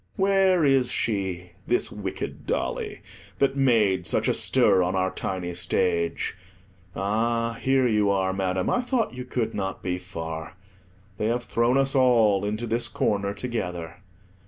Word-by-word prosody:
Where 190 -3 +3
is 135 -3 +3
she, 95 -5 -2 0.2
this 120 - +1
wicked 100 -2 -6
dolly, - - -2 0.4
that 140 0 +2
made 105 -10 +2
such - - 0
a - - +3
stir 105 -8 +4
on 90 +1 0
our 95 0 +1
tiny 90 -2 -4
stage? 85 -1 0 0.6
Ah, 115 +3 0
here 135 -1 +3
you 105 -3 +2
are, 95 -1 +1
Madam; 95 -1 -1
I 245 - +2
thought 245 - -1
you 125 0 -6
could 125 -2 -2
not 95 -2 -4
be 90 0 -2
far; 80 -2 -7 0.6
they 105 - 0
have 120 +1 0
thrown 120 +3 +1
us 135 0 +2
all 115 -7 +4
into 105 +3 -2
this 120 +1 0
corner 100 -2 -1
together. 90 -9 -4
105 Hz, 150 wpm, -25 LUFS, 95-125 Hz, 0.6 s, stir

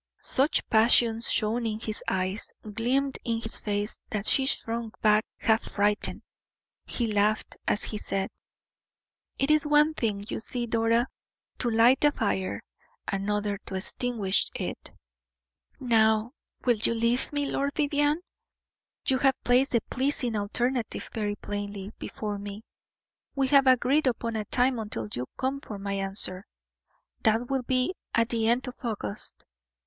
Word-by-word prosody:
Such 275 +4 +2
passion 225 0 +5
shone 230 +1 +1
in 215 -1 -3
his 220 -1 -4
eyes, 190 +3 -2 0.2
gleamed 265 +5 0
in 230 -1 -1
his 225 -1 -3
face, 205 0 -2
that 210 -1 -3
she 265 +3 +4
shrunk 230 -3 -2
back 215 0 +4
half 220 0 +2
frightened. 205 0 +1 0.6
He 240 - 0
laughed, 210 +1 +1
as - - +2
he 210 - -2
said: 195 -1 -2 1.1
"It 275 +2 +1
is 305 -1 +3
one 295 +1 +4
thing, 210 -7 -2
you - - -3
see, 240 +2 -3
Dora, 230 +1 +2 0.5
to 245 - +1
light 235 +4 +4
a 295 - +6
fire, 100 - -2 0.4
another 205 +1 -1
to 190 - -4
extinguish 200 0 +1
it." - - -5 0.9
"Now, 220 -2 +3 0.3
will 240 -3 +4
you 225 +2 +2
leave 235 +2 +1
me, 290 -1 0
Lord 280 0 -1
Vivianne? 295 +2 +1 0.9
You 260 -1 +2
have 270 -1 +4
placed 255 +3 +3
the 235 - +3
pleasing 255 -2 -1
alternative 235 +3 -2
very 210 -2 -2
plainly 205 -1 -5
before 210 -2 -4
me; 205 +1 -7 0.7
we 270 -1 +1
have 275 -1 +5
agreed 260 +3 +4
upon 230 -2 -1
a 215 -1 -2
time 250 +1 +1
until 205 - -3
you 125 +1 -3
come 270 +1 -2
for 210 - -7
my 200 0 -4
answer 195 -1 0 0.7
that 225 +3 +1
will 270 -1 +1
be 255 +6 +1 0.2
at 230 0 +2
the 225 -2 +1
end 245 +3 +2
of 250 - -5
August. 205 - -5
230 Hz, 145 wpm, -27 LUFS, 210-255 Hz, 1.1 s, a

